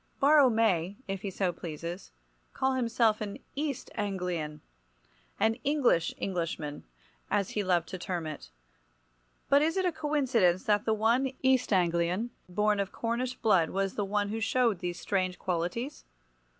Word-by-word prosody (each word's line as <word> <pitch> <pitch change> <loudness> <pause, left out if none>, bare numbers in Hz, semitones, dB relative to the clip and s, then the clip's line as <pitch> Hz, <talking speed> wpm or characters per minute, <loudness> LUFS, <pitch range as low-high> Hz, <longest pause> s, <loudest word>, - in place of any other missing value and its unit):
Borrow 285 -1 +6
may, 200 -5 +1
if 195 -1 -3
he 200 - -3
so 185 -1 -1
pleases, 170 +2 -7 0.4
call 265 0 +1
himself 230 -3 +2
an 205 -1 -4 0.2
East 285 -2 -3
Anglian—"an 170 - -4
English 270 - +2
Englishman," 165 -5 -3 0.4
as 200 -2 0
he 210 - -1
loved 175 -3 +1
to 185 - -6
term 175 -2 -3
it—but - - -4
is 325 +4 +1
it 375 - +1
a 360 - +2
coincidence 265 - +1
that 210 +1 +2
the 220 - +2
one 235 +5 +2
East 260 -2 +3
Anglian 180 +4 +1 0.2
born 210 +3 +1
of 200 -1 -1
Cornish 245 +2 -2
blood 185 -9 +3
was 195 0 -1
the 205 - -1
one 205 +1 0
who 220 +2 -2
showed 230 -3 +2
these 175 0 -4
strange 185 -2 -1
qualities? 185 - -3
200 Hz, 145 wpm, -30 LUFS, 170-235 Hz, 0.4 s, Borrow